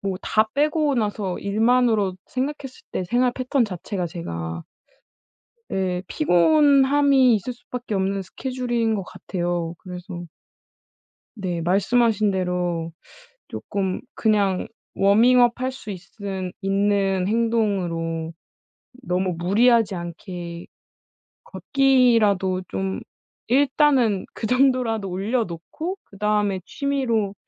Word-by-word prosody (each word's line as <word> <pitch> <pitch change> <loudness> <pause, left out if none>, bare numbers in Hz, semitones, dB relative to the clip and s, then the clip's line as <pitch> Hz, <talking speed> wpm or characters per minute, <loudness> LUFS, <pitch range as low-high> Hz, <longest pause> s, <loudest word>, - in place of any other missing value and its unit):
뭐 195 -2 -2
다 215 0 +2
빼고 300 0 +2
나서 205 -5 -2
일만으로 220 -2 +2
생각했을 270 0 -4
때 185 - -2
생활 245 +5 +1
패턴 255 0 0
자체가 185 -2 -4
제가 85 - -5 1.1
예 185 -2 -1
피곤함이 280 - +4
있을 245 +5 -3
수밖에 245 -2 -6
없는 195 +1 0
스케줄인 240 +1 -2
것 195 - -3
같아요. 175 -2 -3
그래서 180 -1 -8 1.1
네 180 -5 -3
말씀하신 210 +3 +2
대로 180 -3 -2 0.6
쪼끔 190 -2 -3
그냥 200 -4 +1 0.3
워밍업 240 +5 +4
할 260 +1 0
수 220 -5 -9
있은 190 0 -6
있는 195 -1 +1
행동으로 190 -8 0 0.7
너무 180 -1 0
무리하지 215 +3 +3
않게 170 0 -7 0.8
걷기라도 230 - +2
좀 190 0 -3 0.5
일단은 265 -5 +3
그 220 - -5
정도라도 250 -6 +2
올려놓고 220 - -3
그다음에 205 -1 0
취미로 265 -8 -1
205 Hz, 225 characters per minute, -23 LUFS, 185-250 Hz, 1.1 s, 피곤함이